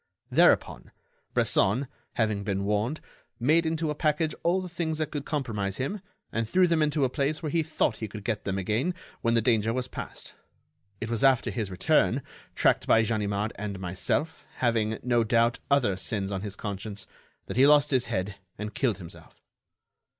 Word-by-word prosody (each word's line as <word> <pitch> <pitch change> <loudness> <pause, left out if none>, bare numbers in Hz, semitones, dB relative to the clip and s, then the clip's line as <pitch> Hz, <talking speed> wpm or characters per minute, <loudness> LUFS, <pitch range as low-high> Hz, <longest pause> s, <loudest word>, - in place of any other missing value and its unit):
Thereupon, - - +3 0.5
Bresson, 120 +9 +2 0.3
having 110 -3 0
been 100 -1 -1
warned, 105 +8 0 0.4
made 160 +7 +3
into 160 -1 -1
a - - 0
package 155 +1 0
all 175 +3 +2
the 185 - -5
things 165 -3 -2
that 155 -1 -2
could 145 -2 -4
compromise 105 -10 -2
him 160 +10 -3 0.3
and 115 -1 -2
threw 185 +6 +5
them 165 -2 +2
into 150 -1 +2
a - - +3
place 150 +4 -1
where 155 - -2
he 165 - +2
thought 155 -7 0
he 110 - -4
could 105 0 -8
get 110 -1 -2
them 95 -1 -2
again 110 - 0 0.3
when 115 0 +2
the 115 - +3
danger 115 -2 +2
was 125 +1 -2
past. - - -7 0.7
It 115 - -3
was 115 +1 0
after 135 -2 +4
his 110 -5 -3
return, 90 -2 +2 0.3
tracked - - +2
by 115 - +5
Ganimard 105 -1 -1
and 100 -2 -4
myself, 95 - -2
having, 110 -3 +1
no 120 -1 +3
doubt, 115 +1 +2
other 130 -9 +3
sins 100 0 -2
on 95 -1 -2
his 100 -1 -5
conscience, 100 0 -5 0.4
that - - -6
he 135 +2 +7
lost 145 -1 +5
his 130 -3 +2
head 100 -2 -2 0.2
and 105 +1 -5
killed 115 -6 0
himself." 85 -4 -12
115 Hz, 180 wpm, -27 LUFS, 105-150 Hz, 0.7 s, he